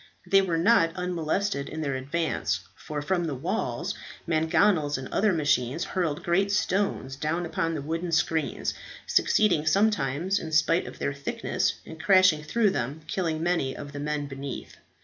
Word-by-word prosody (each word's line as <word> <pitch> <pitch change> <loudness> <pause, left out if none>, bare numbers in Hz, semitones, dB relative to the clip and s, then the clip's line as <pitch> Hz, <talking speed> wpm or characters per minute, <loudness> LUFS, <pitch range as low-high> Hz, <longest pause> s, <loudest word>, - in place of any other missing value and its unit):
They 195 0 +5
were 175 -4 0
not 165 -2 +4
unmolested 180 -2 -1
in 160 - -5
their 140 -3 -1
advance, 150 +5 -1
for, 150 -1 -5
from 175 +2 0
the 150 -4 -2
walls, 130 - -2 0.3
mangonels 160 -1 +2
and 130 0 -6
other 215 0 +2
machines 150 -2 +1
hurled 170 -3 -2
great 195 +3 +2
stones 195 -9 0
down 155 +5 -1
upon 165 0 -1
the 145 - -4
wooden 165 +3 -3
screens, 160 0 0 0.3
succeeding 180 -8 +3
sometimes, 190 -1 +2
in 160 -1 -7
spite 160 +3 +3
of - - -9
their 140 - -2
thickness, 140 0 -1
in 160 - -9
crashing 185 -4 +5
through 205 +7 +2
them, 140 -1 -3
killing 165 -3 -1
many 165 -7 0
of 145 -1 -7
the 145 - -6
men 150 0 -2
beneath. 135 -1 -7
160 Hz, 160 wpm, -27 LUFS, 145-180 Hz, 0.3 s, They